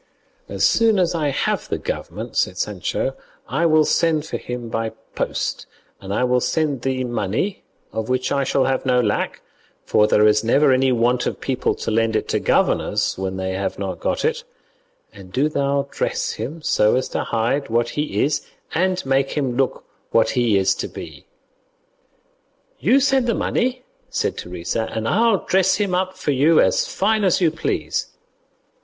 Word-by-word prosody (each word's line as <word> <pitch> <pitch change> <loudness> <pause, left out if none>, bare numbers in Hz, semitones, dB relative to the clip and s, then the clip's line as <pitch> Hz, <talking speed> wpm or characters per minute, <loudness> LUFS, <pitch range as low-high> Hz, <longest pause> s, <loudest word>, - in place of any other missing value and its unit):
"As - - +1
soon 225 -2 +4
as 180 -2 +2
I 155 -4 0
have 140 - -1
the - - -1
government," - - -5
said 90 - 0
Sancho, 105 +7 -2 0.3
"I 150 +8 +1
will 155 -1 +4
send 160 -2 +2
for - - -4
him 125 -1 -6
by 115 -1 -3 0.2
post, - - -3 0.3
and 95 0 -8
I 105 - +1
will 125 0 +3
send 145 -1 0
thee 130 0 -1
money, 120 - -2 0.3
of 110 +1 -3
which 130 0 0
I 140 -1 +1
shall 135 0 +1
have 135 0 0
no 125 -2 +2
lack, 105 -4 -1 0.4
for 105 - +3
there 105 0 +4
is 105 0 +4
never 135 +4 +4
any 130 0 +3
want 120 +1 +1
of - - -3
people 130 -2 -1
to - - -4
lend 115 0 +1
it - - 0
to - - +1
governors - - +1
when 95 0 -4
they 95 0 -2
have 95 +1 -3
not 95 -2 -4
got - - -1
it; 470 +1 0 0.7
and 95 -1 -13
do 135 +8 +2
thou 140 -1 0
dress - - -1
him 155 +4 -6
so 105 -6 +3
as 130 +1 0
to - - -2
hide 120 +5 -1
what 120 +1 +1
he 150 +1 -1
is 145 0 0 0.3
and 185 0 0
make 135 0 +1
him 135 -5 -1
look 135 +1 0 0.3
what 115 - +3
he 120 -5 +2
is 95 0 +3
to - - -3
be." - - -10 1.5
"You 245 - +4
send 270 -2 +2
the 230 - +1
money," 255 +1 -1 0.3
said - - -1
Teresa, 90 +5 -3
"and 110 0 -3
I'll 220 - +2
dress 190 0 +3
him 200 -2 -1
up 185 +1 -1
for 155 - -1
you 150 +4 +4
as - - +3
fine 215 +2 +1
as 185 -3 +3
you 170 -4 +3
please." 165 - -2
135 Hz, 180 wpm, -21 LUFS, 115-165 Hz, 1.5 s, soon